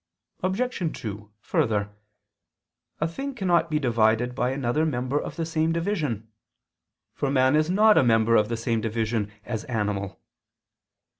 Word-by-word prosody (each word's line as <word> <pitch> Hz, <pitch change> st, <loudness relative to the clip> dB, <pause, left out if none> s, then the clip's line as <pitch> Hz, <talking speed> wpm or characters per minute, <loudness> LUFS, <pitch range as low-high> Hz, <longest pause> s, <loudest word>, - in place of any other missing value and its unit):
Obj. 220 Hz, +8 st, -1 dB, 0.2 s
2: 105 Hz, -1 st, -7 dB
Further, 105 Hz, -2 st, 0 dB, 1.0 s
a 155 Hz, -, +1 dB
thing 270 Hz, +11 st, -5 dB
cannot 175 Hz, -6 st, +2 dB
be 155 Hz, -, +1 dB
divided 120 Hz, -2 st, +2 dB
by 125 Hz, 0 st, 0 dB
another 135 Hz, +2 st, 0 dB
member 130 Hz, -1 st, 0 dB
of -, -, -7 dB
the 165 Hz, -, -2 dB
same 160 Hz, 0 st, 0 dB
division; 160 Hz, -, -2 dB, 0.9 s
for 140 Hz, -, -2 dB
man 130 Hz, 0 st, +3 dB
is 155 Hz, +1 st, +2 dB
not 210 Hz, +3 st, +5 dB
a -, -, +4 dB
member 115 Hz, -1 st, +4 dB
of 105 Hz, -1 st, +3 dB
the 115 Hz, -, -2 dB
same 115 Hz, -1 st, -1 dB
division 110 Hz, -1 st, -1 dB
as 110 Hz, -3 st, -4 dB
"animal." 105 Hz, -5 st, -2 dB
125 Hz, 145 wpm, -25 LUFS, 110-160 Hz, 1.0 s, not